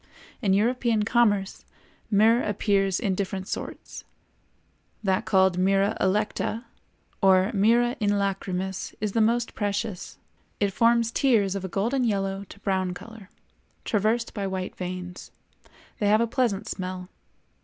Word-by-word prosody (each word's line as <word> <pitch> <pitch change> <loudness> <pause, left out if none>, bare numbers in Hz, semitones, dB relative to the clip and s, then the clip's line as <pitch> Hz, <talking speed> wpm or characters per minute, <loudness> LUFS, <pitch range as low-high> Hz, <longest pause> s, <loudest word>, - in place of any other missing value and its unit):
In 195 -2 +2
European 230 +1 +2
commerce 205 -4 +1 0.5
myrrh 225 +3 +4
appears 195 -2 +1
in 200 -6 0
different 190 0 -3
sorts; - - -6 1.0
that 190 -2 +1
called 190 -2 +3
myrrha 195 +2 +2
electa 210 +3 0 0.6
or 190 +1 +4
myrrha 235 +4 +3
in 210 -2 +1
lacrimis 190 -2 -2
is 210 -1 -2
the 225 - +1
most 235 +2 +1
precious; 205 -2 -3 0.4
it 200 -2 +1
forms 230 +1 +3
tears 225 -8 +2
of 195 -1 -4
a - - -2
golden 230 +9 0
yellow 195 -3 -1
to 200 - -14
brown 190 -2 -1
color, 220 -1 -11 0.6
traversed 220 +2 0
by 200 -2 -3
white 190 -1 -4
veins; 180 0 -6 0.7
they 205 - +1
have 215 +1 +5
a - - +3
pleasant 235 -4 -1
smell. 185 -1 -5
200 Hz, 135 wpm, -26 LUFS, 190-225 Hz, 1.0 s, have